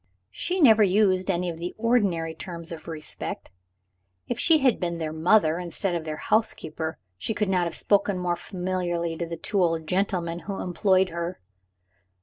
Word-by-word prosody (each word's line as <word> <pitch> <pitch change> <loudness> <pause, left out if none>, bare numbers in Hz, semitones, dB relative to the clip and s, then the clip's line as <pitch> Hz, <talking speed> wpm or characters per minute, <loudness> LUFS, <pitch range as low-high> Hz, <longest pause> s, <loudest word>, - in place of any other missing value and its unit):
She 360 - -2
never 225 -9 +7
used 190 -1 +3
any 180 -1 0
of 165 -2 -4
the 175 +1 -5
ordinary 200 -9 +1
terms 170 0 -7
of 165 -1 -8
respect. 160 - -5 0.8
If - - -3
she 325 -2 +5
had 265 -5 +2
been 170 -2 -2
their 155 -2 -3
mother, 160 0 +3
instead 180 +2 -2
of 170 -2 -3
their 155 -1 -4
housekeeper, 160 -8 -1 0.2
she 220 - -3
could 210 -2 0
not 180 -2 +2
have 170 - -3
spoken 200 -1 +2
more 180 -1 0
familiarly 175 -2 -2
to 170 - -3
the 165 0 -5
two 195 +4 -1
old 165 -2 +1
gentlemen 180 -2 -1
who 195 +3 -5
employed 185 +1 +2
her. 170 +1 -4
180 Hz, 170 wpm, -26 LUFS, 165-200 Hz, 0.8 s, never